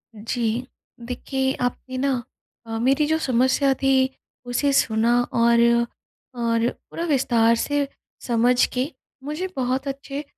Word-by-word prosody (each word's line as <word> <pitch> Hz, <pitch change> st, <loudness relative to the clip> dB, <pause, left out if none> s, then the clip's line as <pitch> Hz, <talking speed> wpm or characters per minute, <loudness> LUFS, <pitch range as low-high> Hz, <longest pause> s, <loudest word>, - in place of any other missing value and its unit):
जी। 230 Hz, +2 st, -2 dB, 0.4 s
देखिए 265 Hz, +2 st, -2 dB
आपने 250 Hz, +1 st, -3 dB
ना 260 Hz, -2 st, 0 dB, 0.4 s
अ, 225 Hz, 0 st, -4 dB
मेरी 270 Hz, +5 st, +3 dB
जो 315 Hz, +1 st, +2 dB
समस्या 260 Hz, +2 st, +2 dB
थी, 265 Hz, -1 st, +3 dB, 0.4 s
उसे 245 Hz, +4 st, +1 dB
सुना 235 Hz, -1 st, +3 dB
और 235 Hz, 0 st, +4 dB, 0.8 s
और 230 Hz, 0 st, +2 dB
पूरा 330 Hz, -, -8 dB
विस्तार 235 Hz, -6 st, +3 dB
से 285 Hz, +4 st, 0 dB, 0.4 s
समझ 245 Hz, +1 st, +3 dB
के 255 Hz, +2 st, 0 dB, 0.4 s
मुझे 305 Hz, +6 st, -3 dB
बहुत 260 Hz, +1 st, -1 dB
अच्छे 275 Hz, +1 st, -5 dB
255 Hz, 120 wpm, -23 LUFS, 235-275 Hz, 0.8 s, और